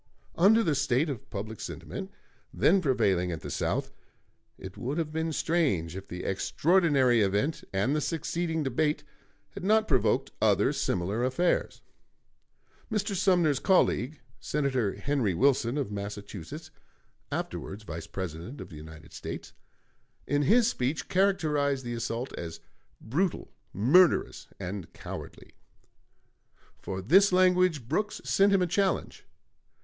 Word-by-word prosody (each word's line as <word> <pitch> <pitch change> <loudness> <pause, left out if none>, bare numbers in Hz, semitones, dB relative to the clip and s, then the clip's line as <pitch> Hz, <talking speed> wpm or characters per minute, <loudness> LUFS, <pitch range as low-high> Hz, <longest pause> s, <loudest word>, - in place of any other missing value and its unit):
Under 215 +7 +5
the 160 - +1
state 140 +2 +1
of 125 - -8
public 105 +2 -6
sentiment - - -6 0.4
then 160 - +3
prevailing 100 - +1
at 80 - -5
the - - -6
South, - - -1 0.7
it 95 0 -9
would 135 +5 -4
have 160 -2 -2
been 160 +1 -2
strange 140 - 0
if 95 0 -8
the 90 0 -6
extraordinary 140 - +2
event 105 +11 0
and 100 +9 +1
the 150 - 0
succeeding 165 0 -2
debate 150 +3 0 0.5
had - - -8
not 215 +2 +3
provoked 130 -4 +2
other - - +3
similar 95 +6 -1
affairs. 150 +8 0 1.1
Mr. 205 -2 -1
Sumner's 175 -7 +3
colleague, 155 - +2 0.2
Senator 130 -8 -1
Henry 130 -10 0
Wilson, 135 - +2
of 135 -8 -2
Massachusetts 100 - -7 0.6
(afterwards 105 +3 -4
Vice 85 -4 -7
President 95 - -6
of - - -8
the 80 - -10
United 80 +1 -12
States), - - -7 0.7
in 145 +1 +1
his 225 - +4
speech 140 - -2
characterized 150 -8 +1
the 120 - -3
assault 115 +2 -3
as 85 -1 -6 0.4
"brutal, 170 - -2 0.2
murderous, 140 - +3
and 95 -1 -6
cowardly." - - -9 1.3
For 95 0 -5
this 190 - +5
language 180 -7 +3
Brooks 210 - -1
sent 200 +1 +3
him 195 -2 +4
a - - +3
challenge. 190 +3 -1
140 Hz, 130 wpm, -28 LUFS, 100-170 Hz, 1.3 s, Under